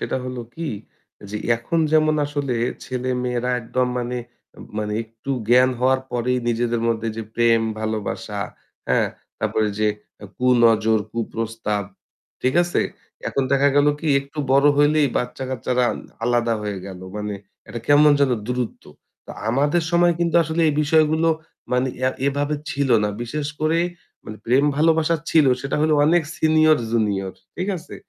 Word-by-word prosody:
সেটা -, -, -2 dB
হলো 125 Hz, -1 st, -5 dB
কী, 165 Hz, -, -7 dB, 0.7 s
যে 105 Hz, -, -3 dB, 0.2 s
এখন 115 Hz, +9 st, -2 dB
যেমন 155 Hz, 0 st, +4 dB
আসলে 145 Hz, -2 st, -2 dB, 0.3 s
ছেলে-মেয়েরা 125 Hz, -1 st, -2 dB
একদম 125 Hz, +2 st, -1 dB
মানে, 125 Hz, 0 st, -3 dB, 0.6 s
মানে 105 Hz, 0 st, -2 dB
একটু 115 Hz, +4 st, -9 dB, 0.2 s
জ্ঞান 125 Hz, +2 st, +5 dB
হওয়ার 130 Hz, +1 st, +3 dB
পরেই 125 Hz, +1 st, 0 dB
নিজেদের 120 Hz, 0 st, 0 dB
মধ্যে 115 Hz, 0 st, -1 dB
যে 115 Hz, -, -3 dB
প্রেম-ভালোবাসা, 110 Hz, -2 st, 0 dB, 0.5 s
হ্যাঁ? -, -, +2 dB, 0.3 s
তারপরে 110 Hz, -1 st, 0 dB
যে 110 Hz, -, +2 dB, 0.3 s
আ -, -, -7 dB
কুনজর, 115 Hz, -3 st, +4 dB
কুপ্রস্তাব, 115 Hz, -2 st, -3 dB, 0.6 s
ঠিক 130 Hz, +1 st, +1 dB
আছে? 175 Hz, -, 0 dB, 0.5 s
এখন 140 Hz, -, 0 dB
দেখা 140 Hz, +1 st, +4 dB
গেল 145 Hz, 0 st, +5 dB
কী 160 Hz, -, -5 dB
একটু 140 Hz, +2 st, -13 dB
বড় 140 Hz, +2 st, +5 dB
হইলেই 145 Hz, 0 st, +4 dB
বাচ্চা-কাচ্চারা 125 Hz, 0 st, -1 dB, 0.4 s
আলাদা 120 Hz, -1 st, +2 dB
হয়ে 105 Hz, -2 st, -3 dB
গেল। 95 Hz, -2 st, -9 dB, 0.2 s
মানে 105 Hz, -1 st, -3 dB, 0.3 s
একটা 120 Hz, +3 st, -6 dB
কেমন 145 Hz, +1 st, +6 dB
যেন 140 Hz, -, +4 dB, 0.2 s
দূরত্ব। 125 Hz, -1 st, -3 dB, 0.4 s
তো -, -, -9 dB, 0.2 s
আমাদের 145 Hz, +7 st, +2 dB
সময় 175 Hz, 0 st, +4 dB
কিন্তু 170 Hz, -1 st, 0 dB
আসলে 160 Hz, +1 st, -2 dB
এই -, -, +2 dB
বিষয়গুলো 155 Hz, +1 st, +3 dB, 0.4 s
মানে 125 Hz, +1 st, +2 dB, 0.2 s
এ -, -, +4 dB, 0.2 s
এভাবে 145 Hz, +2 st, 0 dB, 0.2 s
ছিল 140 Hz, -1 st, -1 dB, 0.2 s
না। -, -, +1 dB
বিশেষ 145 Hz, +5 st, -3 dB
করে 155 Hz, +2 st, +2 dB, 0.5 s
মানে 110 Hz, -, -8 dB
প্রেম-ভালোবাসা 150 Hz, +6 st, +3 dB
ছিল 155 Hz, -3 st, +5 dB
সেটা 135 Hz, +2 st, -2 dB
হলো 155 Hz, 0 st, +3 dB
অনেক 170 Hz, +3 st, +4 dB
সিনিয়র-জুনিয়র। 115 Hz, -11 st, +2 dB, 0.2 s
ঠিক 185 Hz, +3 st, -2 dB
আছে? 170 Hz, +1 st, -10 dB
125 Hz, 140 wpm, -22 LUFS, 115-150 Hz, 0.7 s, কেমন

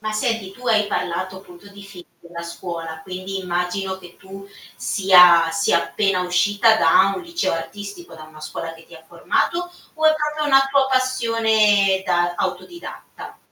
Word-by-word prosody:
Ma 215 Hz, 0 st, -4 dB
senti 215 Hz, -2 st, -2 dB
tu 250 Hz, +5 st, -12 dB
hai 215 Hz, -3 st, +2 dB
parlato 185 Hz, -1 st, -3 dB
appunto 190 Hz, 0 st, -16 dB
di 200 Hz, 0 st, -13 dB
film 195 Hz, -3 st, -13 dB, 0.2 s
della 170 Hz, 0 st, -10 dB
scuola, 170 Hz, -1 st, -7 dB
quindi 185 Hz, +2 st, -6 dB
immagino 180 Hz, +1 st, -3 dB
che 175 Hz, -2 st, -15 dB
tu 195 Hz, +1 st, -12 dB, 0.3 s
sia 180 Hz, -4 st, +5 dB
sia 200 Hz, +5 st, +1 dB
appena 195 Hz, -3 st, -1 dB
uscita 200 Hz, +5 st, +2 dB
da 195 Hz, 0 st, +4 dB
un -, -, -6 dB
liceo 340 Hz, 0 st, -2 dB
artistico, 205 Hz, -, -8 dB
da 155 Hz, -, -11 dB
una 155 Hz, 0 st, -15 dB
scuola 165 Hz, +1 st, -7 dB
che 165 Hz, 0 st, -16 dB
ti 170 Hz, -, -16 dB
ha 160 Hz, -, -14 dB
formato 175 Hz, -, -1 dB, 0.4 s
o 315 Hz, -1 st, -4 dB
è 310 Hz, -, +5 dB
proprio 300 Hz, 0 st, -2 dB
una 270 Hz, -1 st, +4 dB
tua 275 Hz, -1 st, +3 dB
passione 220 Hz, -6 st, +2 dB
da 175 Hz, -1 st, 0 dB
autodidatta? 345 Hz, -1 st, -7 dB
195 Hz, 165 wpm, -20 LUFS, 175-225 Hz, 0.4 s, sia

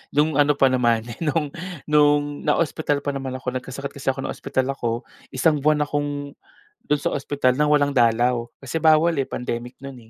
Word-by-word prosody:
No'ng 150 Hz, 0 st, +2 dB
ano 145 Hz, 0 st, +4 dB
pa 135 Hz, -2 st, +3 dB
naman, 120 Hz, -3 st, +2 dB, 0.2 s
no'ng 150 Hz, -2 st, -1 dB, 0.4 s
no'ng 145 Hz, -1 st, +3 dB
naospital 150 Hz, -3 st, 0 dB
pa 145 Hz, -, -1 dB
naman 135 Hz, -1 st, -5 dB
ako. 130 Hz, -1 st, -4 dB
Nagkasakit 140 Hz, +2 st, -7 dB
kasi -, -, -11 dB
ako, 135 Hz, -, -5 dB
naospital 130 Hz, +1 st, -2 dB
ako, 120 Hz, -2 st, -3 dB, 0.3 s
isang 150 Hz, +3 st, +2 dB
buwan 150 Hz, +1 st, +2 dB
akong 145 Hz, -1 st, -3 dB, 0.6 s
do'n 150 Hz, -1 st, +1 dB
sa -, -, 0 dB
ospital 140 Hz, -2 st, 0 dB
ng 150 Hz, -, +3 dB
walang 145 Hz, -1 st, +3 dB
dalaw. 120 Hz, 0 st, +2 dB, 0.2 s
Kasi 150 Hz, +5 st, -3 dB
bawal 160 Hz, +1 st, +5 dB
eh, 135 Hz, -, -1 dB
pandemic 125 Hz, +1 st, -5 dB
no'n 125 Hz, -5 st, -10 dB
140 Hz, 170 wpm, -23 LUFS, 130-150 Hz, 0.6 s, bawal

